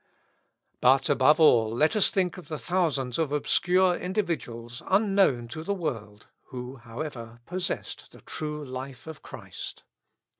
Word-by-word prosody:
But, 135 +3 +4
above 145 +3 +5
all, 120 -8 +6
let 155 - +3
us 210 - +4
think 185 -2 0
of 180 - -13
the 155 - -4
thousands 150 -8 0
of 155 -3 0
obscure 180 +5 +3
individuals 145 - -3
unknown 195 - +3
to 155 +6 -6
the 200 +4 -1
world, 115 - -5 0.2
who, 125 +1 -7
however, 115 -1 -7
possessed 180 0 -4
the - - -16
true 150 -1 -5
life 130 0 -7
of 160 -2 -9
Christ. - - -9
150 Hz, 140 wpm, -27 LUFS, 125-180 Hz, 0.2 s, all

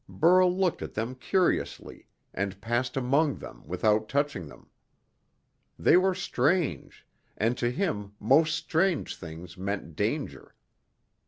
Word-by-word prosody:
Burl 180 +2 +4
looked 185 -3 +1
at - - -7
them 115 +4 -2
curiously, 180 +8 -1 0.3
and 100 0 -3
passed 120 +4 -1
among 140 +4 +2
them - - -10
without 105 +5 +1
touching 140 - -1
them. 65 - -15 1.1
They - - +4
were 185 +1 +3
strange, 175 -2 -1 0.3
and 115 +3 +1
to 120 - +1
him 105 - -2
most 150 +9 +4
strange 170 0 0
things 85 +1 -10
meant 95 -4 -4
danger. - - -3
125 Hz, 120 wpm, -28 LUFS, 100-165 Hz, 1.1 s, Burl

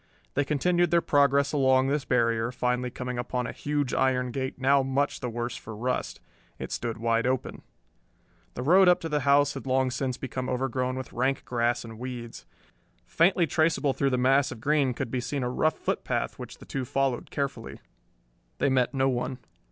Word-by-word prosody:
They 145 - +1
continued 175 +5 +1
their 170 +1 +4
progress 140 -2 +2
along 130 -2 +4
this 140 +1 0
barrier, 115 -1 +1
finally 125 0 -1
coming 125 0 -5
upon 125 0 -2
a 115 - -4
huge 145 -2 -2
iron 125 -1 +1
gate 130 +1 -3
now 135 +1 +3
much 135 +2 -1
the 125 - -3
worse 120 +1 -4
for 110 - -8
rust. 125 +4 -2 0.4
It - - -7
stood 115 -2 -3
wide 115 +1 +1
open. 130 -1 -2 0.9
The 125 - -4
road 185 +6 +6
up 180 0 +5
to 165 - -4
the 150 -1 +1
house 145 0 +3
had - - -8
long 130 0 +2
since 130 0 -2
become 130 -1 -4
overgrown 130 0 -1
with 130 - -7
rank 130 +3 0
grass 120 0 0
and 110 -1 -10
weeds. 120 -2 -7 0.6
Faintly 175 +1 +3
traceable 155 -3 +1
through 140 - +1
the 130 - 0
mass 135 +2 +3
of 120 - -8
green 140 -1 +1
could 115 - -4
be 125 - -1
seen 140 +1 -3
a 125 - -1
rough 155 +5 +1
footpath - - -2
which - - -8
the - - -14
two 135 - -3
followed 135 0 -1
carefully. 140 -1 -4 0.8
They - - +2
met 130 0 +1
no 135 0 +2
one. 125 0 -2
130 Hz, 190 wpm, -27 LUFS, 125-140 Hz, 0.9 s, road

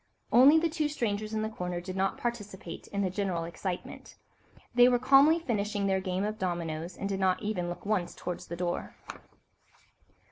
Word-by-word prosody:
Only 275 +6 +8
the 330 +1 +3
two 310 -2 -1
strangers 215 -6 -2
in 215 -1 -1
the - - 0
corner 180 -4 -4
did 185 +1 -7
not 195 0 0
participate 205 -7 -5
in 200 0 -2
the 185 - 0
general 185 -4 -1
excitement. 175 +2 -6 0.6
They 245 +1 +7
were 245 - +3
calmly 275 +5 +6
finishing 210 -9 -1
their 190 -1 +1
game 185 0 -2
of 215 +1 -3
dominoes, 170 -2 -3
and 195 - -3
did 195 -1 -2
not 185 +1 +1
even 190 -5 -2
look 175 - -7
once 200 -4 -1
towards 180 -1 -5
the 170 - -5
door. 175 0 -3
200 Hz, 180 wpm, -29 LUFS, 180-235 Hz, 0.6 s, Only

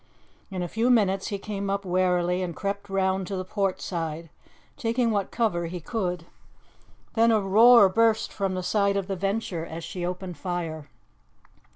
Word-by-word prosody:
In 185 -3 -3
a - - -3
few 225 +7 0
minutes 195 -5 +3
he 205 - -2
came 200 0 -4
up 200 0 -2
warily 180 0 +1
and 175 -3 -3
crept 200 0 -4
round 190 -1 0
to 195 - -3
the 185 0 -4
port 195 0 -1
side, 165 -2 -4 0.4
taking 230 0 0
what 200 -2 -1
cover 190 -8 0
he 180 +2 -5
could. 180 -2 -3 0.9
Then 230 0 +4
a 220 - +4
roar 215 +3 +7
burst 220 +3 +2
from 195 -2 -1
the 185 - -3
side 200 +1 +1
of 195 - -1
the 195 0 -3
Venture 195 -3 -2
as 165 0 -7
she 175 +2 -5
opened 180 -1 -4
fire. 165 -3 -4
190 Hz, 175 wpm, -26 LUFS, 180-205 Hz, 0.9 s, roar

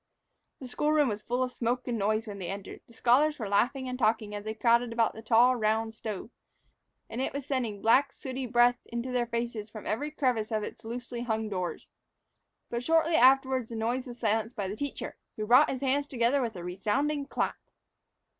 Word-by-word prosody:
The 260 - -7
school 295 +4 0
room 300 -4 +4
was 210 -1 -3
full 245 +4 -1
of 255 - -2
smoke 245 +1 -2
and 245 - -1
noise 215 +3 +1
when 205 -2 -7
they 180 - -4
entered. 195 0 -7
The 235 - -18
scholars 280 +7 +3
were 220 - -4
laughing 250 +6 +1
and 250 0 -4
talking 215 -2 +1
as 205 0 -5
they 220 0 -3
crowded 235 +1 +3
about 230 -1 +1
the 220 - -9
tall, 235 +3 +5
round 220 0 0
stove; 220 0 -6 0.8
and 235 - -4
it - - -2
was 280 -1 -4
sending 240 -8 -2
black, 265 +5 +4
sooty 260 -1 -5
breath 240 +1 +4
into 235 +2 -4
their 245 -1 0
faces 235 -2 -3
from 215 0 -9
every 285 +8 -1
crevice 250 -7 0
of 215 -1 0
its 225 - -8
loosely 240 +1 -5
hung 220 -2 -2
doors. 185 -3 -4 0.8
But 235 0 -2
shortly 325 +3 +3
afterward 265 -3 +4
the 230 - -7
noise 240 +4 -1
was 240 -1 -8
silenced 225 +1 0
by 200 -2 -2
the 195 - -4
teacher, 285 +5 -5 0.2
who 215 - -3
brought 250 +7 +6
his 260 - -3
hands 280 +1 +1
together 250 +2 +1
with 230 -4 -2
a 175 - -7
resounding 275 +11 -1
clap. - - -1
235 Hz, 205 wpm, -29 LUFS, 220-260 Hz, 0.8 s, brought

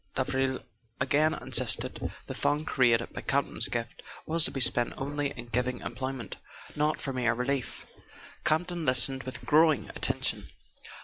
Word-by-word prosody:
Davril 130 0 0 0.4
again 145 +4 +3
insisted, - - 0
the - - -5
fund 150 +1 0
created 120 -5 +3
by - - -5
Campton's 140 0 0
gift 115 -1 -4 0.2
was 165 0 +5
to - - +4
be 135 - -4
spent 120 -1 +1
only 145 +1 -1
in 120 -3 -8
giving 125 +1 0
employment, 130 -2 -5 0.4
not 150 +1 +1
for 135 - -3
mere 120 -2 +1
relief. 125 +1 -2 0.6
Campton 170 +2 +1
listened 130 0 +3
with 130 -1 -7
growing 155 +1 +4
attention. - - -1
135 Hz, 140 wpm, -29 LUFS, 125-145 Hz, 0.6 s, was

